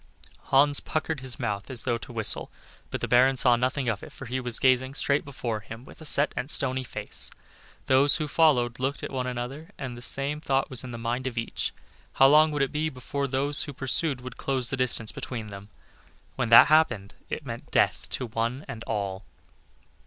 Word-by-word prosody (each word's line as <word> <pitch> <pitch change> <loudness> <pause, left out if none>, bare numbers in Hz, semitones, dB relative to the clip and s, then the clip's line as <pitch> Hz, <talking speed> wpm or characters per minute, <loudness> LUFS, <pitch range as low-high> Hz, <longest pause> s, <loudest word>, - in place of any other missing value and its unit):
Hans 145 +1 +4
puckered 155 -1 -3
his 130 -1 -6
mouth 105 -4 -3
as 125 -4 0
though 120 -1 0
to 95 - -10
whistle, - - 0 0.4
but - - -4
the - - -1
Baron 130 +2 +4
saw 125 -1 +5
nothing 130 +2 -1
of 105 -4 -1
it, - - -10
for 135 - -10
he 130 +2 -3
was 120 -2 0
gazing 130 +1 +2
straight 140 0 +1
before 120 -6 -4
him 115 +4 -10
with - - -15
a - - -9
set 145 0 +3
and 135 - -4
stony 130 -3 +2
face. - - -2 0.6
Those 135 +2 +4
who 155 -1 -2
followed 130 -7 +3
him - - -8
looked 135 +2 -2
at - - -4
one 130 -2 -2
another, 125 +7 -5
and 130 -3 -6
the 120 - -10
same 140 +4 -2
thought 135 -4 0
was 130 - 0
in 130 - -7
the 120 - -6
mind 120 +3 -2
of 120 -2 -5
each 115 - -2 0.4
how 135 - +5
long 155 +2 +6
would 145 -2 0
it 135 - -1
be 155 +1 -1
before 140 +1 -4
those 140 +2 +1
who 145 - -7
pursued 135 +1 0
would 125 -1 -9
close 130 -3 -1
the - - 0
distance 120 -3 +2
between 115 -4 -6
them? 100 +1 -10 0.7
When 125 -3 -1
that 115 - +10
happened 125 -11 +2 0.2
it 150 - -5
meant 120 -2 -7
death - - +1
to 130 - -2
one 115 +5 -3
and 115 0 -7
all. 100 -3 -3
130 Hz, 210 wpm, -26 LUFS, 120-140 Hz, 0.7 s, that